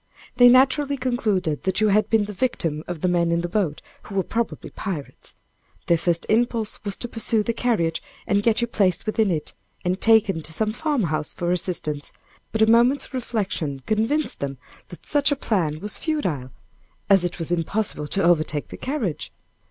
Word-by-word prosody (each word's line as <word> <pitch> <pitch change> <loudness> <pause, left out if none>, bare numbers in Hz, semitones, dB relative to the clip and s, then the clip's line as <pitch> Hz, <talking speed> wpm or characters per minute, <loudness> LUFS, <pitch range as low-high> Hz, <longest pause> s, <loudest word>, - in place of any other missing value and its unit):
They 245 0 +8
naturally 275 +3 +4
concluded 210 - -1
that 190 - 0
you 215 -1 +3
had 210 +2 +2
been 220 -2 +3
the 210 - -7
victim 165 - -1
of 175 -3 -5
the - - +1
men 170 -1 +2
in 170 0 +1
the 175 - -2
boat, 175 -6 -1 0.2
who 200 - -10
were 190 - +2
probably 230 +3 -3
pirates. 170 -9 -6 0.5
Their 170 -1 +3
first 170 0 0
impulse 230 -1 0
was 200 -2 -2
to 240 - -4
pursue 225 -1 +1
the 230 - -1
carriage, 220 -10 0 0.2
and 200 0 +2
get 225 +2 +2
you 235 - +1
placed 195 -6 +1
within 215 -1 +1
it, 160 -4 -2 0.3
and 180 +2 -1
taken 210 -6 +4
to 155 - -5
some 215 +6 0
farmhouse 215 - -1
for 175 0 -2
assistance; 160 -5 -2 0.4
but 220 0 +2
a - - +7
moment's 240 +5 +3
reflection 195 - -3
convinced 225 +8 0
them 140 -1 -4 0.3
that 175 - -13
such 290 0 +2
a - - +3
plan 175 - -1
was 210 - +1
futile, 180 - -2 0.6
as 195 -2 +5
it 175 - -2
was 165 0 -2
impossible 175 -2 -1
to 195 +5 -1
overtake 155 -3 +1
the - - -8
carriage. 240 - -3
200 Hz, 185 wpm, -23 LUFS, 170-230 Hz, 0.6 s, They